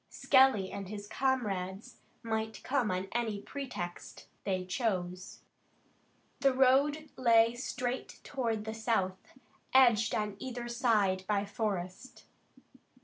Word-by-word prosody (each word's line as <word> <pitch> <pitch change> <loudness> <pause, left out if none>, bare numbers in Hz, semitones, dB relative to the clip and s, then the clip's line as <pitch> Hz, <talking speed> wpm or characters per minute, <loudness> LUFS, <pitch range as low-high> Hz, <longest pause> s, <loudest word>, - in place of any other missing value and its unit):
Skelly 260 -8 +4
and 195 -2 -6
his 205 -1 -6
comrades 205 -6 -2 0.3
might 220 -1 -3
come 255 -5 +1
on 185 +1 -2
any 225 -3 -1
pretext 200 -9 -7 0.2
they 185 -2 -1
chose. 185 -3 -3 1.0
The 275 -2 +3
road 280 +4 +3
lay 230 -2 +5
straight 250 0 -4
toward 230 -6 -2
the 220 - -4
south, 220 -2 -2 0.4
edged 235 -4 +5
on 210 -2 -2
either 245 -2 -5
side 215 -6 +1
by 205 -1 +1
forest. 200 +1 -4
220 Hz, 110 wpm, -31 LUFS, 195-255 Hz, 1.0 s, lay